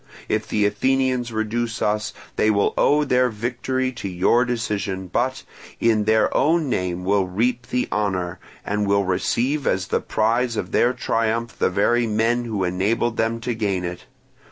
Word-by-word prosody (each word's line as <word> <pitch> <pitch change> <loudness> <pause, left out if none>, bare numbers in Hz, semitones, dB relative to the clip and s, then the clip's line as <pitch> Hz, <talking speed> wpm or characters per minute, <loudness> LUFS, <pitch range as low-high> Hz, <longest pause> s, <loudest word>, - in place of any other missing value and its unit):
If 110 0 -1
the 105 -1 +1
Athenians 125 +3 +1
reduce 115 +2 -2
us, 105 0 0 0.2
they 110 - +2
will 100 -1 +2
owe 150 +1 +3
their 125 -2 +2
victory 125 +3 -2
to 110 -5 -6
your 95 +7 +3
decision, 100 -5 -2
but 125 +8 -1 0.4
in 110 -2 +2
their 110 0 +2
own 160 -3 +2
name 90 -2 -2
will 100 -1 +2
reap 120 +6 -1
the 125 0 -1
honour, 95 -4 -1 0.3
and 105 0 -1
will 100 0 +3
receive 125 +9 0
as 95 -1 0
the - - +1
prize 115 +2 0
of 90 - -3
their 120 - +3
triumph 115 -1 -1
the - - +3
very 115 +5 +2
men 115 +3 +1
who 105 -5 -2
enabled 105 +6 0
them 115 +1 0
to 120 +1 -2
gain 100 -5 -1
it. 90 0 -6
110 Hz, 165 wpm, -22 LUFS, 100-120 Hz, 0.4 s, owe